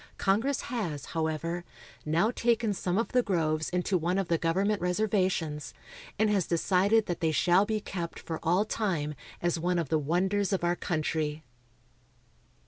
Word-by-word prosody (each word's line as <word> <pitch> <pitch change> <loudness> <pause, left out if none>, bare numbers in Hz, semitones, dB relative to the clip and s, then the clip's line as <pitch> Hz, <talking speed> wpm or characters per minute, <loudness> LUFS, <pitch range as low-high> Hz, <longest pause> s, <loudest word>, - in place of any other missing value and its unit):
Congress, 225 +8 +1
has, 175 - -3
however, 165 +2 -2 0.4
now 170 +9 +2
taken 230 -3 +1
some 180 -1 -1
of 230 - 0
the 250 - +3
groves 160 -7 0
into 180 +1 0
one 175 +3 0
of 195 -3 -1
the 165 - +3
government 195 +5 +1
reservations, 180 -5 0 0.4
and 220 +1 +3
has 200 -5 +1
decided 195 +6 +3
that 175 - -3
they 160 -1 +1
shall 180 +5 +4
be 220 -1 0
kept 175 -4 -5
for 160 -1 -5
all 180 +6 +2
time 175 -9 -1 0.3
as 175 -1 +1
one 175 +2 0
of 165 -5 -1
the 160 - +2
wonders 185 +6 +1
of 190 -3 0
our 175 0 +2
country. 155 -2 -2
180 Hz, 160 wpm, -29 LUFS, 165-205 Hz, 0.4 s, shall